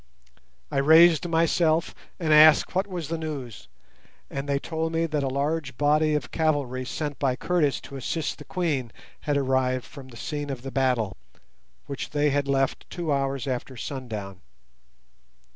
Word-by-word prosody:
I 140 - -2
raised 160 +3 +6
myself 165 0 +2 0.3
and 160 -3 +2
asked 155 0 +7
what 190 +2 0
was 175 -6 -5
the 165 0 -2
news, 140 -8 -6 0.6
and 140 +1 -4
they 140 - +2
told 160 +2 -3
me 165 0 +1
that 155 -2 -1
a 135 - -1
large 140 -1 -2
body 150 +1 +3
of 130 -4 -3
cavalry 145 -5 0
sent 145 +3 -4
by 130 -3 +1
Curtis 155 -1 +1
to 140 - -9
assist 155 +5 -3
the 150 - -10
Queen 150 - -2 0.4
had 145 - +3
arrived 130 -2 +1
from 140 -3 -11
the 120 -3 -13
scene 145 +3 -4
of 130 -3 -5
the 135 - -6
battle, 125 - 0 0.7
which 140 - -5
they 150 0 +1
had 140 0 0
left 135 -1 0
two 170 -4 -2
hours 135 -2 -1
after 130 0 -4
sundown. 110 -9 -6
145 Hz, 160 wpm, -26 LUFS, 130-160 Hz, 0.7 s, asked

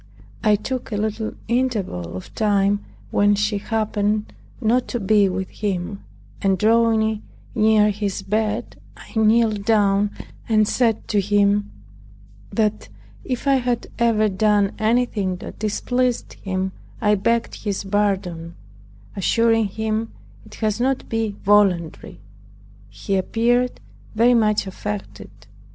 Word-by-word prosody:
I 215 -2 +5
took 250 +4 -4
a 210 - -1
little 215 +1 -2
interval 210 - -1
of 90 - -10
time 205 -2 +1 0.3
when 205 0 +3
she 205 0 0
happened 215 -1 -1 0.3
not 245 +1 +1
to 240 - -3
be 205 -1 +3
with 190 +1 -3
him, 200 -1 -3 0.4
and 195 -1 +2
drawing 220 0 +2 0.3
near 215 -2 +4
his 200 -1 -3
bed, 215 +3 -2 0.2
I - - -14
kneeled 220 -1 +3
down 205 -1 +3 0.4
and 215 -2 +4
said 230 -2 +1
to 210 - +2
him, 205 +1 +2 0.8
"That 215 -2 -1 0.3
if 250 0 -4
I 275 -1 +4
had 245 -2 -2
ever 225 -2 +3
done 205 0 +2
any 235 +3 +3
thing 195 -6 -2
that 180 - -9
displeased 245 +3 -1
him 190 -1 -3 0.3
I 210 0 +3
begged 230 +4 0
his 205 -2 -2
pardon, 190 -4 -1 0.6
assuring 225 +2 +2
him 220 +2 -3 0.3
it - - -13
had 215 0 -1
not 260 +1 0
been 225 -2 -1
voluntary." 195 -5 +2 0.7
He 195 -1 -2
appeared 240 +5 +1 0.4
very 235 +3 +5
much 215 -3 +2
affected. 205 +1 -6
210 Hz, 125 wpm, -22 LUFS, 200-225 Hz, 0.8 s, I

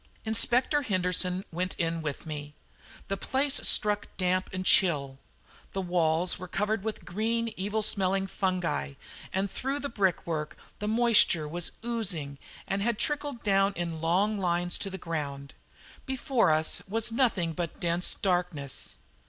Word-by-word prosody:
Inspector 245 +6 +3
Henderson 185 -4 0
went 180 +3 -2
in 165 -1 -1
with 150 -3 -5
me. 150 -1 -6 0.5
The 195 - -2
place 270 +7 +1
struck 210 -1 +5
damp 185 0 +1
and 185 0 -4
chill. 140 -9 +3 0.5
The 195 - -1
walls 175 -1 +1
were 185 - -7
covered 210 +2 -1
with 220 -1 -4
green, 230 +3 -1
evil 205 +3 -1
smelling 195 -1 +1
fungi, 180 - -1 0.4
and 195 +1 0
through 270 +2 -2
the 280 - -3
brickwork 170 -7 -1 0.2
the 210 - -3
moisture 220 -8 +4
was 170 +3 -3
oozing 175 -12 -2 0.3
and 195 +1 -1
had 235 +1 0
trickled 285 -1 -2
down 195 -1 +3
in 170 -3 -4
long 195 +6 +2
lines 175 -1 +1
to 195 - -1
the 190 - -6
ground. 145 -5 -5 0.5
Before 265 - +1
us 155 0 +2
was 225 +2 +1
nothing 220 -9 +1
but 170 0 -4
dense 170 +1 0
darkness. 175 -7 -2
185 Hz, 145 wpm, -28 LUFS, 165-215 Hz, 0.5 s, struck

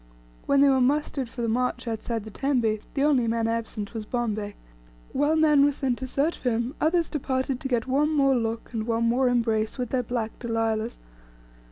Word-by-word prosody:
When 280 0 +4
they 280 - +6
were 265 -1 +3
mustered 275 -1 0
for 240 0 -5
the - - 0
march 250 +2 -1
outside 225 0 -3
the 220 - -9
tembe, 240 -4 0 0.2
the 275 - +1
only 270 -5 +3
man 225 0 0
absent 225 -2 -3
was 225 -2 -4
Bombay. 215 -3 -3 0.6
While 290 +3 +2
men 300 -3 +5
were 290 - +4
sent 265 -3 -2
to 260 - -4
search 285 +6 0
for 250 - 0
him, 235 +3 -1
others 330 +1 +2
departed 260 -2 -2
to 270 - -3
get 240 -3 0
one 280 +4 +2
more 275 -3 +3
look, 230 0 -3
and 220 -1 -3
one 230 0 +1
more 245 +2 +3
embrace 225 -2 0
with 250 -2 -3
their 260 - +1
black 230 -2 -4
Delilahs. 225 -1 -1
245 Hz, 200 wpm, -26 LUFS, 225-275 Hz, 0.6 s, they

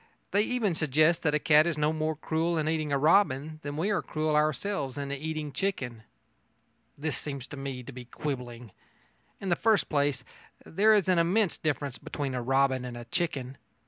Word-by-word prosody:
They 200 - +4
even 220 -4 0
suggest 155 +2 +3
that 150 -2 +1
a - - +2
cat 150 +2 +5
is 165 -3 -1
no 150 +1 +1
more 155 0 -1
cruel 165 +2 -1
in 155 -1 0
eating 155 -1 0
robin 155 0 +2
than 145 -1 -5
we 190 +7 0
are 195 - +1
cruel 155 -1 -1
ourselves 150 -1 0
in 140 -1 -4
eating 155 +1 -4
chicken. 135 - -3 1.0
This 150 +1 -2
seems 140 -4 -5
to - - -7
me 135 -2 -5
to 140 - -9
be 125 -1 -9
quibbling. 125 -4 -5 0.7
In 195 - -4
the 175 - +3
first 220 0 +2
place, 140 -3 +1 0.4
there 215 +5 +4
is 200 -3 +2
an 185 -2 +4
immense 185 +4 +2
difference 145 -3 -2
between 140 -3 -4
a 125 - -2
robin 135 +1 +2
and 125 -1 -6
a 120 - -8
chicken. 135 -2 -3
150 Hz, 185 wpm, -28 LUFS, 135-165 Hz, 1.0 s, cat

